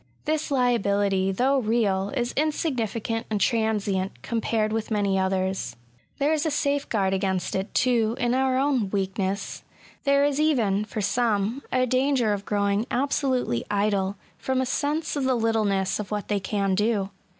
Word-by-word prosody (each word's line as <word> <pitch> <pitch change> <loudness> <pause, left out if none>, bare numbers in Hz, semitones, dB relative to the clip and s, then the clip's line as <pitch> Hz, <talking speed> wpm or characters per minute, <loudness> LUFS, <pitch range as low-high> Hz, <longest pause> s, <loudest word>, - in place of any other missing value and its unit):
This 310 +1 -1
liability^ 200 -7 +1
though 270 +2 +3
real^ 210 -4 +1
is 240 0 -1
insignificant 240 -7 -1
and 215 -2 -1
transient^ 205 -4 +1
compared 220 -2 0
with 225 -1 -2
many 200 -3 +1
others. 190 0 -1 0.4
There 290 +3 +2
is 310 -1 0
a 320 - +1
safeguard 280 -10 0
against 190 -1 -1
it^ 190 +1 -1
too, 235 -2 +2
in 245 -2 +1
our 260 0 +2
own 265 -7 +1
weakness* 195 0 -2 0.4
There 280 0 +4
is 290 0 0
eyen, 225 -10 +2
for 215 0 -4
some, 225 +2 0
a 255 0 +2
danger 255 -3 +2
of 200 0 -4
growing 200 +1 +1
absolutely 255 - 0
idle, 200 -1 0 0.2
from 260 0 -1
a 260 - +1
sense 300 +5 -1
of 280 -2 -1
the 260 -1 +2
little 225 -2 +1
ness 195 -1 0
of 210 - -5
what 210 -1 -4
they 205 -1 +1
can 195 0 -1
do. 205 -1 0
220 Hz, 160 wpm, -25 LUFS, 200-260 Hz, 0.4 s, There